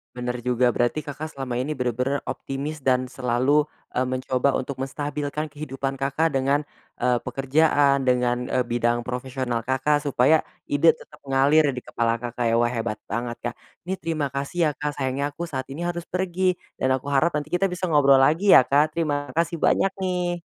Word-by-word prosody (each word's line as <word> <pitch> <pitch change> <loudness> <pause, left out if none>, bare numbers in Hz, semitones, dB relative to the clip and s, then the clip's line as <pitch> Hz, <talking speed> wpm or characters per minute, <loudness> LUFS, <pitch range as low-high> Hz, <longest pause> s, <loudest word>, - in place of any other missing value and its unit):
Benar 125 -1 -4
juga, 125 0 +2
berarti 120 +5 +1
Kakak 155 +2 -5
selama 130 -3 -5
ini 130 +5 -1
benar-benar 125 +1 -1
optimis 140 +2 -5
dan 130 -1 +2
selalu, 130 +4 +1 0.3
eee, 130 - +2
mencoba 130 +1 0
untuk 135 +1 -5
menstabilkan 145 +2 -3
kehidupan 135 -2 -4
Kakak 140 +3 0
dengan, 140 +2 +1 0.3
eee, 125 0 +2
pekerjaan, 140 0 +2
dengan, 125 -1 +1
e 130 - +2
bidang 120 0 0
profesional 125 -2 -3
Kakak, 135 +3 +1
supaya 145 +2 +3 0.2
ide 145 +3 +5
tetap - - -15
mengalir 140 +3 +4
di 125 - -5
kepala 115 -1 -1
Kakak 120 0 -4
ya. 115 0 +2
Wah 120 - +3
hebat 115 -2 -3
banget, 120 +2 -3
Kak. 120 -1 -4 0.3
Ini 190 - -1
terima 155 -5 -2
kasih 140 +5 -5
ya, - - +2
Kak, 150 0 -2
sayangnya 140 +2 -1
aku 170 +4 -5
saat 130 -4 -3
ini 145 - -7
harus 175 -1 -3
pergi, 185 0 -1 0.2
dan 130 - 0
aku 130 +1 -1
harap 145 +5 +2
nanti 150 0 -3
kita 180 +3 0
bisa 185 0 -2
ngobrol 140 -4 +5
lagi 165 +9 +4
ya, 125 - +8
Kak. 150 +3 +3
Terima 145 -4 -2
kasih 170 +2 0
banyak 195 - +3
nih. 175 -1 -1
135 Hz, 180 wpm, -24 LUFS, 125-150 Hz, 0.3 s, ya